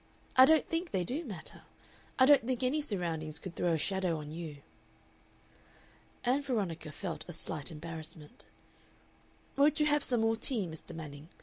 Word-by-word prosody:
I 260 - +10
don't 315 +2 +4
think 335 +1 -1
they 185 -8 0
do 270 - -2
matter. 195 - -7 0.6
I 260 - +7
don't 275 -2 +7
think 255 +1 -2
any 280 +5 +2
surroundings 165 - -2
could 180 +1 -7
throw 175 - +1
a - - +2
shadow 185 0 0
on 150 -1 -7
you." 155 -3 -7 1.6
Ann 255 +4 +2
Veronica 195 - -2
felt 170 +2 -5
a 175 - -6
slight 155 -2 -4
embarrassment. 160 -1 -9 1.1
"Won't 300 +3 +4
you 300 - +4
have 295 0 +3
some 245 -3 +4
more 225 0 +3
tea, 225 -5 0
Mr. 160 +1 -6
Manning?" 150 -1 -8
185 Hz, 165 wpm, -32 LUFS, 160-260 Hz, 1.6 s, I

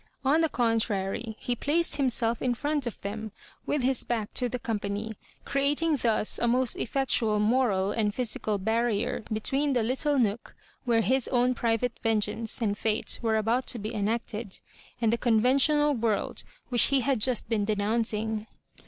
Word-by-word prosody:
On 300 +5 +4
the 325 - +2
con* 230 -4 +1
trary, 215 +1 -2
he 245 - -2
placed 315 +7 0
himself 235 -4 +1
in 250 -2 0
front 290 0 -1
of 235 - -6
them, 215 +2 -5 0.4
with 290 -3 0
his 260 0 0
back 225 -3 -3
to 250 -1 -1
the 250 - -3
company, 215 -1 -3 0.3
creatmg 290 +2 +1
thus 220 -2 +1
a 235 - +1
most 250 +1 +1
effiectual 235 -4 0
moral 210 -4 +2
and 210 -1 0
physical 215 -3 -1
barrier 220 +2 0
between 270 +6 0
the 245 -3 +1
little 270 +5 0
nook 230 -2 -1 0.3
where 230 -2 +3
his 260 +2 +1
own 250 0 +2
private 235 0 -1
vengeance 225 +1 0
and 205 -1 -1
fate 220 -1 0
were 225 -2 +1
about 230 +4 0
to - - +1
be 215 +1 -5
enacted, 215 -1 -3 0.4
and 230 -1 +2
the 235 - 0
conven 245 +2 +3
tional 295 +1 +3
world 225 -3 -1 0.2
which 240 -3 +4
he 275 -1 +2
had 260 -3 0
just 250 0 +1
been 220 -2 0
denouncing. 215 +1 -1
230 Hz, 170 wpm, -27 LUFS, 215-255 Hz, 0.4 s, On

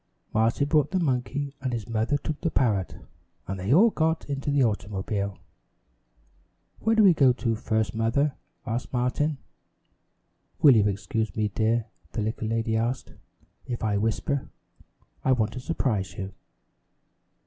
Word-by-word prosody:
Martin 115 +6 +2
brought 150 -1 +3
the 190 - 0
monkey, 140 -1 -1
and 130 -1 -2
his 115 -4 -4
mother 115 +5 +1
took 155 +1 -5
the 165 - +1
parrot, 105 - +1 0.5
and 95 0 -4
they 95 +5 -2
all 210 - +6
got 160 -1 0
into 140 0 -3
the 140 -1 +3
automobile. 100 -2 -2 1.4
"Where 225 0 +2
do 220 - +5
we 190 -3 +7
go 135 -5 +5
first, 110 -3 -1
Mother?" 115 +6 +1 0.3
asked 115 +2 -3
Martin. 130 +4 0 1.2
"Will 140 -5 +7
you 105 -2 +4
excuse 110 +2 -2
me, 105 -1 0
dear," 110 +3 +1 0.3
the 110 - -1
little 110 0 -2
lady 115 0 0
asked, 120 +3 -2 0.5
"if 120 -2 -4
I 105 -2 +1
whisper? 115 +6 -1 0.7
I 130 - +4
want 110 -3 0
to 125 - -5
surprise 120 - -1
you." 95 0 -5
120 Hz, 145 wpm, -26 LUFS, 110-140 Hz, 1.4 s, we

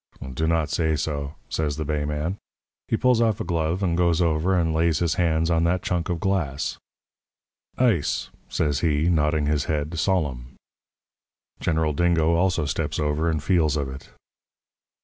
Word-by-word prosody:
"'Do 80 +5 -1
not 80 -2 +1
say 80 -2 +1
so,' 70 -1 -3
says 75 -2 -2
the 80 - -3
bay 75 0 -1
man. 75 +6 -3 0.5
He 115 - +1
pulls 125 -1 +3
off 110 -3 +2
a - - -2
glove 85 +1 -1
and 85 -3 +1
goes 85 -1 +2
over 85 +2 +2
and 80 -2 +1
lays 80 0 +2
his 85 -1 +1
hand 80 -1 +1
on 85 0 +2
that 90 +2 +1
chunk 85 -1 -1
of 85 -2 -1
glass. 80 -7 -1 1.0
"'Ice,' 115 - +1 0.2
says 75 -3 0
he, 80 0 +1
nodding 75 -2 +2
his 75 -1 0
head, 80 +2 -2
solemn. 75 -8 -1 1.0
"General 80 -2 0
Dingo 85 0 +2
also 85 -2 +1
steps 70 - -2
over 75 +2 0
and 80 -3 -1
feels 80 -4 +2
of 70 -2 -2
it. 65 +2 -10
80 Hz, 165 wpm, -24 LUFS, 75-85 Hz, 1.0 s, pulls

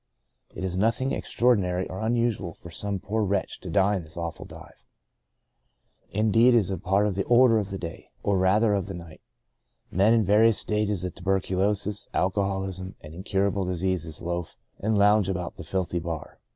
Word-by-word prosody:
It - - -5
is 90 -1 -2
nothing 115 +7 +1
extraordinary 95 -7 +1
or 95 - -7
unusual 110 -6 0
for 85 - -12
some 100 +3 -3
poor 105 +4 -2
wretch 100 -1 -1
to 90 - -8
die 100 +4 +3
in - - -4
this 80 +1 -11
awful 85 -2 -5
dive. - - -14 1.3
Indeed, 115 +4 +4
it - - +7
is 100 -4 +1
part 100 +2 +2
of 105 - 0
the 95 +1 -1
order 120 -2 +5
of 100 -2 -4
the 95 - -4
day 85 -3 -8
— - - -37
or 100 -2 +2
rather 105 +4 +3
of 100 -1 -1
the 95 - -6
night. 85 -2 -11 0.7
Men 100 +6 +4
in 115 - +3
various 105 +2 +4
stages 105 -4 -1
of 90 - -4
tuberculosis, 95 +2 -1
alcoholism, 95 -1 -1
and 75 +1 -11
incurable 95 +2 -1
dis 90 -1 -3
ease 85 -4 -2
loaf 85 -1 -4 0.2
and 110 +1 +1
lounge 105 -1 +4
about 90 -2 -4
the - - -7
filthy 90 -2 -2
bar. 80 -2 -6
95 Hz, 180 wpm, -26 LUFS, 90-105 Hz, 1.3 s, it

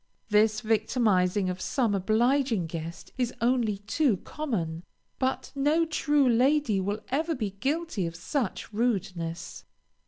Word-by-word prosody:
This 215 +1 +3
victimizing 215 -4 +2
of 180 0 -3
some 235 -3 +1
obliging 225 +2 +2
guest 165 +1 -7
is 245 -1 0
only 235 -3 +1
too 220 - +1
common, 175 - -4 0.4
but 260 0 -1
no 295 +4 +2
true 295 -3 +2
lady 250 -2 +3
will 205 +3 -2
ever 315 +5 0
be 215 -6 -2
guilty 270 - -2
of 165 - -7
such 220 - -3
rudeness. 185 -7 -2
220 Hz, 125 wpm, -28 LUFS, 190-270 Hz, 0.4 s, This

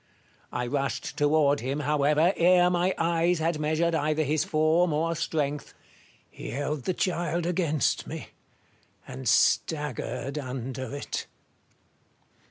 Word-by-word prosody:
I 125 - -2
rushed 140 +2 -2
toward 145 -1 +3
him, 135 +4 -3
however, 150 +4 +2
ere 180 +1 +4
my 180 +1 +1
eyes 170 +1 +2
had 160 0 -1
measured 160 +2 +1
either 155 0 +1
his 150 +1 +1
form 155 +2 +2
or 165 +2 0
strength. 150 -3 -2 0.5
He - - -9
held 145 0 -3
the 185 - 0
child 175 -2 -1
against 165 -4 0
me, - - -7 0.8
and 130 -3 -3
staggered 140 0 0
under 130 0 -5
it. 145 - -4
155 Hz, 120 wpm, -27 LUFS, 140-170 Hz, 0.8 s, ere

